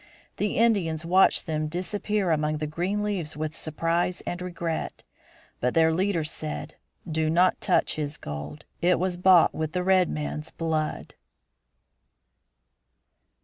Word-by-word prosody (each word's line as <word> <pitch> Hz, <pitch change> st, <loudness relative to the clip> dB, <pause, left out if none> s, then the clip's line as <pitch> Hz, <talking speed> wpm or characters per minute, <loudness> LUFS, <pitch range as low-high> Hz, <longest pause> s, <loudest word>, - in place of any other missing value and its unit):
The 205 Hz, -, -1 dB
Indians 185 Hz, -9 st, +2 dB
watched 185 Hz, +3 st, +4 dB
them 155 Hz, -2 st, -1 dB
disappear 190 Hz, +3 st, -1 dB
among 155 Hz, -1 st, +1 dB
the 155 Hz, -, -3 dB
green 180 Hz, +7 st, -2 dB
leaves 180 Hz, -8 st, -3 dB
with 155 Hz, 0 st, -3 dB
surprise 165 Hz, +3 st, -1 dB
and 175 Hz, +1 st, -5 dB
regret. 170 Hz, -2 st, -4 dB, 0.6 s
But 125 Hz, 0 st, 0 dB
their 160 Hz, 0 st, +4 dB
leader 185 Hz, -1 st, +1 dB
said, 75 Hz, -, -5 dB, 0.3 s
"Do 160 Hz, -1 st, 0 dB
not 180 Hz, +3 st, +3 dB
touch -, -, +1 dB
his 150 Hz, 0 st, -3 dB
gold; 75 Hz, +1 st, -7 dB, 0.2 s
it 180 Hz, +1 st, +4 dB
was 185 Hz, 0 st, -1 dB
bought 180 Hz, -1 st, +5 dB
with 155 Hz, 0 st, -3 dB
the 180 Hz, -1 st, 0 dB
red 185 Hz, -2 st, +4 dB
man's 150 Hz, 0 st, -4 dB
blood." 160 Hz, -2 st, -3 dB
165 Hz, 135 wpm, -26 LUFS, 155-185 Hz, 0.6 s, bought